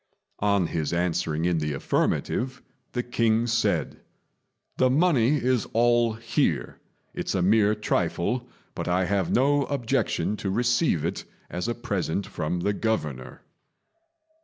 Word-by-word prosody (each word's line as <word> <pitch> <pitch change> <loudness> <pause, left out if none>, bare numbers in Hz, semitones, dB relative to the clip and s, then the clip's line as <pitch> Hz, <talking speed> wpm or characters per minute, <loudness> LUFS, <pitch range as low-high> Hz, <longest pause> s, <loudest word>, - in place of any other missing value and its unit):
On 100 -3 +2
his 80 -1 -2
answering 85 -2 0
in 85 -2 +2
the 75 -1 -2
affirmative, 125 - -1 0.3
the 120 - -1
king 115 -1 +1
said, 115 -1 0 0.8
"The 130 - +4
money 140 -3 +3
is 125 -4 0
all 120 0 +3
here; 115 +1 -1 0.3
it's - - -3
a 90 - +1
mere 105 +2 +4
trifle, 115 +3 -1 0.2
but - - -5
I 90 +1 +2
have 95 -1 0
no 140 +2 +3
objection 125 -5 -1
to 100 - -3
receive 120 - +1
it - - -3 0.3
as 90 +5 -3
a 120 - -1
present 100 -6 -2
from 85 +3 -3
the 100 +3 +1
Governor." 75 - -3
110 Hz, 135 wpm, -26 LUFS, 90-120 Hz, 0.8 s, The